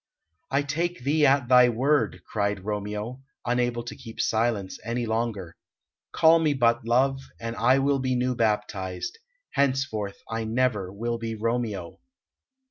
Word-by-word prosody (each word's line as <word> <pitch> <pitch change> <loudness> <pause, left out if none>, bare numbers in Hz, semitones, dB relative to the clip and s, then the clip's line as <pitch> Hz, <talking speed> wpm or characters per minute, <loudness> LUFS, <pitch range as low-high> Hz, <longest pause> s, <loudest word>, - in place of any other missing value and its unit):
"I 140 +1 +1
take 165 +1 -2
thee 145 +2 +3
at 135 -2 +3
thy 125 -1 +7
word!" 135 +6 +1
cried 100 -2 -2
Romeo, 105 +4 -4 0.2
unable 120 -1 0
to 120 - -7
keep 115 -4 -11
silence 110 -4 0
any 120 +1 -2
longer. 110 -6 -2 0.6
"Call 165 +1 +5
me 155 -3 +2
but 120 -2 +2
love, 135 +3 +2 0.2
and 115 0 -4
I 125 +4 +4
will 140 0 +2
be 130 -1 0
new 125 +1 +1
baptized; 105 - -2 0.3
henceforth 130 -8 0
I 115 0 -3
never 110 -4 0
will 115 +4 -3
be 115 -1 -4
Romeo!" 110 -5 -2
120 Hz, 140 wpm, -26 LUFS, 110-130 Hz, 0.6 s, thy